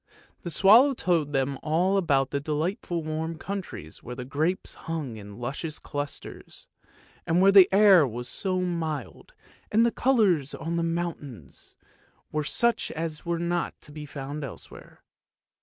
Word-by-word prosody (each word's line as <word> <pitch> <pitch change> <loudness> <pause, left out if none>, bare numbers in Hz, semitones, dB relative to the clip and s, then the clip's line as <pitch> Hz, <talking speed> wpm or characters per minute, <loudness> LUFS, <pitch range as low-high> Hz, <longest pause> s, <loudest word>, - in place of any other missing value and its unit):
The 175 - -5
swallow 225 - +6
told 165 -7 0
them 135 -1 -1
all 175 +5 +1
about 140 -8 +2
the 140 - 0
delight 155 +6 -2
ful 170 -2 -3
warm 160 +1 -3
countries 190 - -7
where 125 - -7
the 125 0 -6
grapes 155 +8 -1
hung 155 -8 -5
in 100 -1 -10
luscious 140 +6 -4
clusters, 145 0 -7 0.6
and 165 +2 +2
where 195 +1 +6
the 195 -2 +8
air 195 -6 +6
was 120 +1 -6
so 185 -2 -2
mild, 160 -6 -4 0.4
and 225 +2 +4
the 235 - +2
colours 205 - +2
on 165 - -4
the 170 - 0
mountains 165 - -5 0.6
were 155 0 -1
such 235 +10 +1
as 160 0 -5
were 170 0 0
not 170 0 -2
to 150 - -11
be 150 0 -8
found 145 +1 -6
elsewhere. 135 - -11
160 Hz, 155 wpm, -26 LUFS, 140-180 Hz, 0.6 s, the